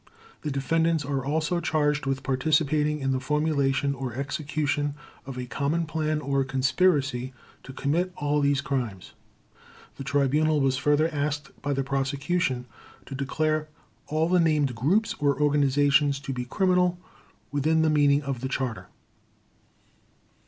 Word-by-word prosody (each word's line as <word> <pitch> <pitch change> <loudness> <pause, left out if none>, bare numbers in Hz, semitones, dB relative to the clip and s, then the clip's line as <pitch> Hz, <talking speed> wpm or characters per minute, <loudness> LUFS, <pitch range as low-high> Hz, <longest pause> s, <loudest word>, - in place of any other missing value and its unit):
The 150 - -3
defendants 160 +3 +1
are 135 -2 -2
also 155 +5 0
charged 150 -3 0
with 135 0 -1
participating 150 +2 +1
in 135 0 0
the 130 - 0
formulation 140 -1 +1
or 130 -3 -5
execution 145 +1 -2 0.3
of 135 -2 -6
a 125 - -4
common 140 +7 -1
plan 155 -1 -1
or 140 -1 0
conspiracy 135 -1 +1 0.3
to 135 - -10
commit 160 +7 -1
all 145 0 0
these 140 -1 +2
crimes. 125 -10 -4 0.8
The - - -6
Tribunal 145 +3 +2
was 135 -1 +2
further 150 +3 +2
asked 145 -1 -2
by 145 - -1
the 135 0 -1
Prosecution 135 0 -1 0.4
to - - -8
declare 155 +3 -1 0.4
all 155 +1 +1
the 180 +1 +3
named 150 -5 +2
groups 170 - +1
or 145 -2 +1
organizations 145 -1 +3
to 135 -1 -4
be 125 -1 -4
criminal 180 - +2 0.5
within 155 +3 +2
the 160 - +3
meaning 145 -1 +3
of 135 -3 -4
the 130 - -3
Charter. 130 -4 -3
145 Hz, 140 wpm, -26 LUFS, 135-155 Hz, 0.8 s, the